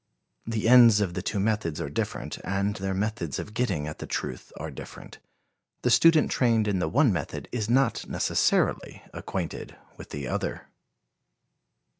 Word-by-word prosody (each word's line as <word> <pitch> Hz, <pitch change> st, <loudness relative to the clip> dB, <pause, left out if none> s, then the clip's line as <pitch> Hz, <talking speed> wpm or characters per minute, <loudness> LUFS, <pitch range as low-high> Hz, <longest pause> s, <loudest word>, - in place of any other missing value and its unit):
The 115 Hz, -1 st, -1 dB
ends 120 Hz, -3 st, +8 dB
of 95 Hz, -4 st, -1 dB
the 90 Hz, -, -3 dB
two 100 Hz, +2 st, -2 dB
methods 100 Hz, -6 st, -1 dB
are -, -, -3 dB
different, 70 Hz, -, -4 dB
and 100 Hz, +2 st, -1 dB
their 95 Hz, 0 st, -2 dB
methods 100 Hz, -6 st, -2 dB
of 105 Hz, -, -6 dB
getting 100 Hz, -11 st, -1 dB
at 75 Hz, -, -7 dB
the -, -, -6 dB
truth 65 Hz, -, -5 dB
are -, -, -6 dB
different. -, -, -11 dB, 0.6 s
The 125 Hz, -, +2 dB
student 160 Hz, +6 st, +5 dB
trained 115 Hz, -4 st, +2 dB
in 100 Hz, -3 st, 0 dB
the 90 Hz, -, -1 dB
one 135 Hz, -4 st, +3 dB
method 80 Hz, -, -4 dB
is 110 Hz, -3 st, -2 dB
not 130 Hz, -1 st, +1 dB
necessarily -, -, 0 dB
acquainted -, -, -5 dB, 0.2 s
with -, -, -11 dB
the 70 Hz, -2 st, -5 dB
other. -, -, -4 dB
105 Hz, 160 wpm, -26 LUFS, 90-115 Hz, 0.6 s, ends